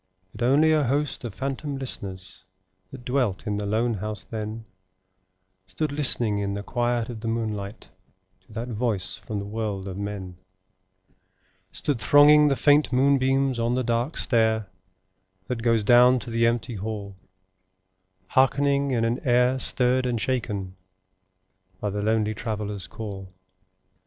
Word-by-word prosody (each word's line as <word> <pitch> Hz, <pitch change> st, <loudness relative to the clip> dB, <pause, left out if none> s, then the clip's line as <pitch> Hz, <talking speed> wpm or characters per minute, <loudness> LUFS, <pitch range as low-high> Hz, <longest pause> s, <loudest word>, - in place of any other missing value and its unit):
But -, -, -11 dB
only 150 Hz, +5 st, +4 dB
a 155 Hz, -2 st, +3 dB
host 145 Hz, +3 st, -1 dB
of 110 Hz, -5 st, -6 dB
phantom 135 Hz, +2 st, -3 dB
listeners 95 Hz, -8 st, -6 dB, 0.5 s
That 130 Hz, -3 st, -11 dB
dwelt 125 Hz, -7 st, 0 dB
in 105 Hz, -1 st, -1 dB
the 105 Hz, 0 st, -3 dB
lone 115 Hz, +3 st, +1 dB
house 105 Hz, -1 st, -5 dB
then 110 Hz, +1 st, -6 dB, 1.0 s
Stood 140 Hz, +11 st, -3 dB
listening 120 Hz, -7 st, +1 dB
in 100 Hz, 0 st, -2 dB
the 100 Hz, -, -5 dB
quiet 120 Hz, 0 st, -1 dB
of 115 Hz, -2 st, -6 dB
the 115 Hz, -, -4 dB
moonlight 110 Hz, -2 st, -4 dB, 0.6 s
To -, -, -16 dB
that 115 Hz, +2 st, -4 dB
voice 110 Hz, -4 st, -1 dB
from 105 Hz, -, -6 dB
the 100 Hz, -, -4 dB
world 105 Hz, -2 st, -4 dB
of 95 Hz, 0 st, -6 dB
men: 100 Hz, -3 st, -5 dB
[Pg 95 Hz, 0 st, -42 dB
65]Stood 145 Hz, -6 st, -1 dB
thronging 145 Hz, +7 st, +6 dB
the 140 Hz, -, +2 dB
faint 145 Hz, +1 st, +4 dB
moonbeams 135 Hz, -1 st, +2 dB
on 115 Hz, +1 st, +1 dB
the 130 Hz, -, 0 dB
dark 120 Hz, +5 st, -1 dB
stair, 110 Hz, -4 st, +1 dB, 0.7 s
That 115 Hz, +3 st, -4 dB
goes 115 Hz, -2 st, +2 dB
down 125 Hz, +3 st, +6 dB
to 120 Hz, -, -8 dB
the 115 Hz, 0 st, +3 dB
empty 120 Hz, +1 st, -1 dB
hall, 100 Hz, -1 st, -5 dB, 1.1 s
Hearkening 140 Hz, +2 st, +2 dB
in 120 Hz, -3 st, +1 dB
an 120 Hz, +3 st, 0 dB
air 125 Hz, 0 st, +2 dB
stirred 125 Hz, 0 st, +1 dB
and 120 Hz, -2 st, -1 dB
shaken 105 Hz, -7 st, -3 dB, 1.0 s
By 105 Hz, -, -2 dB
the 105 Hz, +1 st, -3 dB
lonely 110 Hz, 0 st, +1 dB
Traveller's 105 Hz, -3 st, -4 dB
call. 95 Hz, -1 st, -7 dB
115 Hz, 145 wpm, -25 LUFS, 100-130 Hz, 1.1 s, thronging